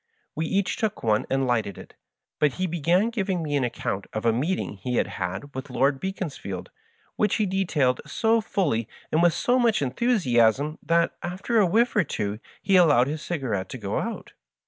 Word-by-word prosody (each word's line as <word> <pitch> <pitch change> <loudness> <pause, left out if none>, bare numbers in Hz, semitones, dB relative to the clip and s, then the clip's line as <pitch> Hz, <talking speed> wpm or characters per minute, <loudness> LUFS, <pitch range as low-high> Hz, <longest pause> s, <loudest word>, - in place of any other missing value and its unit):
We 160 +1 -2
each 195 +2 0
took 220 -3 -2
one 110 -2 +1
and 135 0 +1
lighted 115 -5 0
it, - - -12 0.5
but 150 -3 +3
he 185 - -2
began 175 +6 +1
giving 190 -6 -1
me 145 -2 -2
an 140 - +1
account 100 -4 -3
of 110 +1 -3
a 115 - +4
meeting 145 - -1
he 125 +6 -3
had - - +2
had 95 +10 -5
with 130 +2 -6
Lord 135 +2 +1
Beaconsfield, 150 - -5 0.5
which 210 - +2
he 215 - +1
detailed 170 -9 +1
so 225 0 +2
fully 145 - 0 0.2
and 160 - +3
with 175 -1 +4
so 250 +1 +2
much 230 -3 +3
enthusiasm 140 - +2
that, 170 0 +1
after 190 +6 -1
a 195 - +4
whifiE 230 +6 +2
or 205 - +5
two 105 -7 -3 0.2
he 195 - +4
allowed 145 -8 +5
his 150 +3 -4
cigarette 130 - -3
to - - -6
go - - -2
out. - - -5
155 Hz, 190 wpm, -25 LUFS, 125-190 Hz, 0.5 s, or